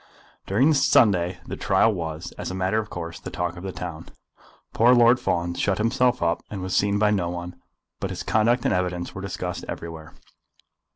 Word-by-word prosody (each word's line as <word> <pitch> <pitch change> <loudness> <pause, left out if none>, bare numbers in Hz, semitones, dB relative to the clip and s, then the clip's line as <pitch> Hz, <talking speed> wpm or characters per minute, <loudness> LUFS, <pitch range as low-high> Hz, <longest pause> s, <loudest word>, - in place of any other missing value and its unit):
During 120 +10 +3
the - - +4
Sunday 90 -9 +3
the - - -5
trial 110 - +2
was, 80 -3 -5
as - - -6
a 90 - -4
matter 95 +3 +1
of 105 -1 -5
course, 85 -2 -6
the - - -7
talk 90 -1 -3
of 90 - -9
the 95 0 -5
town. 85 -3 -7 0.6
Poor 120 +3 +5
Lord 120 +1 +5
Fawn 85 0 -1
shut 95 +2 0
himself 125 +2 +1
up, 85 0 +1
and 100 - -5
was 95 0 -2
seen 100 0 +2
by 105 0 +3
no 90 -5 0
one; 90 0 -6 0.4
but - - -3
his - - -5
conduct 120 +3 +2
and - - +2
evidence 90 -1 -2
were 95 - -7
discussed 95 -2 -4
everywhere. 80 -2 -8
95 Hz, 195 wpm, -24 LUFS, 85-110 Hz, 0.6 s, Poor